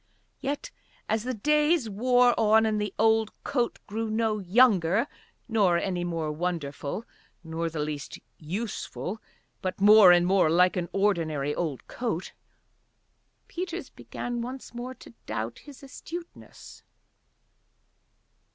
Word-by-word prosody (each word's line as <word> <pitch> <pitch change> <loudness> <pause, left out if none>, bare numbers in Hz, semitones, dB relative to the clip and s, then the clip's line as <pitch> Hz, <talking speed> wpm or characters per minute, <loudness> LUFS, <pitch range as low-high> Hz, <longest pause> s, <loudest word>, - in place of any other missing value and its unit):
Yet 290 - -4 0.4
as 220 +1 -1
the 255 - -1
days 300 +3 +2
wore 245 +4 +3
on 220 0 +5
and 215 -1 0
the 210 -2 -2
old 220 0 +3
coat 245 -4 -1
grew 220 +2 -3
no 220 -1 0
younger, 195 0 +4 0.4
nor 205 -7 +3
any 180 0 -2
more 165 -3 -2
wonderful, 155 +2 -3 0.4
nor 165 0 -3
the 160 -2 -4
least 150 -1 -5 0.2
useful, 200 +3 -5 0.4
but 185 0 -3
more 205 -2 +8
and 175 0 +5
more 185 -3 +3
like 180 +3 +4
an 175 -2 -2
ordinary 160 -8 0
old 150 -6 -3
coat, 220 -8 -4 1.1
Peters 355 0 -5
began 240 -1 -5
once 255 +2 -7
more 245 +2 -6
to - - -15
doubt 110 +1 -4
his 285 -2 -14
astuteness. 335 +5 -10
210 Hz, 125 wpm, -27 LUFS, 170-240 Hz, 1.1 s, more